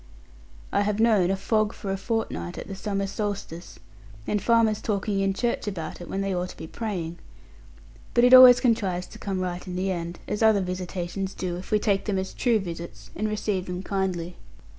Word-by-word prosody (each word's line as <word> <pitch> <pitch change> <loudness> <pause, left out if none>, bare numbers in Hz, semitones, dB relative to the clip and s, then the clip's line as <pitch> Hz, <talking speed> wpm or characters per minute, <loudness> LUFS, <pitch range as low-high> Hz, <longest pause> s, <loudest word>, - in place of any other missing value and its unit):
I - - +2
have 205 +1 0
known 215 -6 +4
a 195 - +2
fog 215 +2 0
for 195 - -5
a - - 0
fortnight 190 - -3
at - - -6
the 195 - -6
summer 195 0 -2
solstice, 195 -4 -5 0.5
and 210 - 0
farmers 230 -2 +3
talking 200 -1 -1
in 195 0 +1
church 235 -1 -1
about 170 -5 -5
it 175 - -9
when 195 - -2
they 195 -1 -1
ought 180 0 -2
to - - -11
be - - -7
praying. 175 -4 -4 1.0
But 240 - +5
it 250 +1 +6
always 255 -1 +11
contrives 195 -7 +1
to - - -13
come 190 -2 -3
right 180 0 -4
in 180 - -5
the 190 +1 0
end, 170 -1 -4
as 210 - -3
other 220 -2 +5
visitations 185 +1 -4
do, 180 -2 -3
if 180 +1 -8
we 215 - +3
take 205 -2 0
them 205 -3 0
as 190 0 -3
true 240 -3 +2
visits, 165 - -7
and 215 - -1
receive 205 -3 -2
them 180 +1 -4
kindly. 180 -3 -2
195 Hz, 205 wpm, -26 LUFS, 180-215 Hz, 1.0 s, always